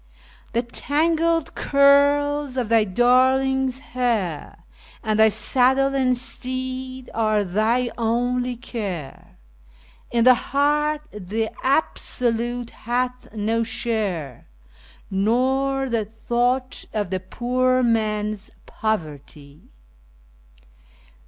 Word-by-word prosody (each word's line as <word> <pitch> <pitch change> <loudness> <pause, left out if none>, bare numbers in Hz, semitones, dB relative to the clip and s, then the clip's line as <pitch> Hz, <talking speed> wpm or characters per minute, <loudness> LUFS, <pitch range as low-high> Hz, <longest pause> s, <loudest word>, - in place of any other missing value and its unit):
The 235 +1 +1
tangled 325 +6 0
curls 285 0 +3
of 240 -4 -1
thy 225 -2 +4
darling's 260 +4 +2 0.2
hair, 225 -11 -2 0.4
and 215 0 0
thy 220 0 +7
saddle 260 +5 +2
and 255 -2 +2
teed 255 0 -4
are 215 -2 +1
thy 220 +6 +1
only 245 +2 0
care; 200 - -6 0.7
In 235 -1 +2
thy 255 +1 +8
heart 295 +4 0
the 210 +3 -3
Absolute 245 -4 -1
hath 250 +2 -3
no 220 +2 0
share, 200 - -3 0.6
nor 265 +7 +1
the 230 -3 0
thought 240 +4 -1
of 205 -4 -2
the 185 - -1
poor 255 +6 0
man's 215 -2 0 0.2
poverty. 150 -8 -5
245 Hz, 90 wpm, -22 LUFS, 215-260 Hz, 0.7 s, thy